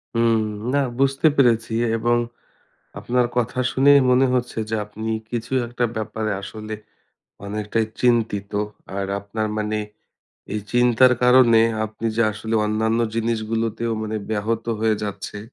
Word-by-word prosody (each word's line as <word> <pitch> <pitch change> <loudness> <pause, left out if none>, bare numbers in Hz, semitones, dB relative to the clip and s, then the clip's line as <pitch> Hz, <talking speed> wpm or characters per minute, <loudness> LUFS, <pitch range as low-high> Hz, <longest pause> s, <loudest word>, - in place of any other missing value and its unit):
হুম। 115 -1 +3 0.3
না 145 - +3 0.2
বুঝতে 135 +3 +3
পেরেছি 115 -5 +3 0.2
এবং 120 +1 +2 0.8
আপনার 125 0 +1
কথা 125 +1 -1
শুনেই 140 +2 +6
মনে 130 +1 +4
হচ্ছে 125 -2 -2
যে 110 - 0
আপনি 110 +2 -6 0.2
কিছু 120 +1 -4
একটা 120 +1 -2
ব্যাপারে 110 0 -3
আসলে 110 +2 -7 0.7
অনেকটাই 105 +2 -1
চিন্তিত। 110 -5 +1 0.4
আর 100 0 -2
আপনার 110 +2 -3
মানে 105 0 -1 0.7
এই 105 - -2
চিন্তার 125 +1 +5
কারণে 125 -2 +6 0.2
আপনি 110 +1 -5
যে 115 - +3
আসলে 110 +2 -4
অন্যান্য 110 +2 0
জিনিসগুলোতেও 115 0 -1
মানে 110 0 -3
ব্যাহত 110 +1 -1 0.2
হয়ে 110 -1 +2
যাচ্ছে, 105 0 -5
115 Hz, 130 wpm, -22 LUFS, 110-120 Hz, 0.8 s, শুনেই